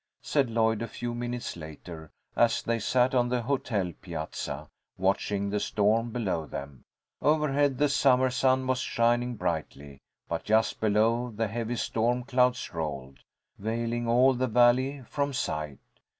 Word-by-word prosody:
said 140 -4 +1
Lloyd 110 -1 +1
a 115 - -2
few 120 0 -5
minutes 120 0 -4
later, 80 0 -9 0.3
as 120 -1 +3
they 115 0 0
sat 125 +4 +2
on 120 -1 +2
the 125 -1 0
hotel 110 -8 -1
piazza, 80 -3 -5 0.3
watching 100 +1 0
the 105 - 0
storm 110 +4 +1
below 95 -9 -2
them. 70 -3 -8 0.4
Overhead 145 -3 +2
the 150 - +3
summer 130 -3 +3
sun 130 +1 +2
was 130 -1 0
shining 120 0 +1
brightly, 80 -6 -4 0.3
but 85 - -3
just 110 +1 +2
below 110 +3 +2
the 115 0 -2
heavy 115 +3 -3
storm 120 +2 0
clouds 125 -1 +1
rolled, 70 -5 -5 0.4
veiling 115 +2 -2
all 125 +3 +5
the 130 +1 0
valley 125 +4 +3
from 140 +3 -2
sight. 75 - -3
115 Hz, 145 wpm, -28 LUFS, 100-125 Hz, 0.4 s, all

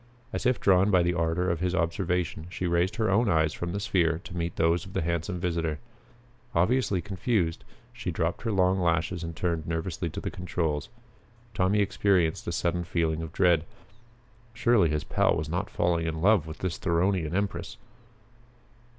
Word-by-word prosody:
As - - 0
if 125 - +2
drawn 95 +1 +4
by 90 -3 +4
the 85 +1 +1
ardor 85 +1 0
of 85 - -2
his 90 0 0
observation, 85 -1 -1
she 90 0 -4
raised 85 +4 +1
her 110 -4 +1
own 110 +3 +3
eyes 80 -3 +2
from 85 0 -4
the 100 - -2
sphere 85 -5 +1
to 90 - -9
meet 85 0 -2
those 85 +1 +2
of - - -11
the - - -1
handsome 85 +2 -2
visitor. 85 -3 -1 0.8
Obviously 100 0 +2
confused, 95 -4 -1 0.3
she 115 -6 -5
dropped 85 0 -1
her 115 - -2
long 95 -1 +2
lashes 85 0 0
and 85 0 -5
turned 85 -2 -2
nervously 85 +1 -2
to - - -6
the - - -4
controls. 80 -5 -2 0.6
Tommy 100 +3 +2
experienced 95 -5 +1
a - - -1
sudden 85 +1 -1
feeling 80 -2 -1
of 80 -2 -6
dread. 85 -3 +3 0.9
Surely 115 -7 +3
his 75 -1 -1
pal - - +2
was 75 - -3
not 90 +5 -2
falling 85 -1 0
in 80 -1 -3
love 95 -2 +3
with 80 - -7
this 90 -3 -3
Theronian 85 -1 +1
empress! 100 0 -2
85 Hz, 175 wpm, -27 LUFS, 80-95 Hz, 0.9 s, drawn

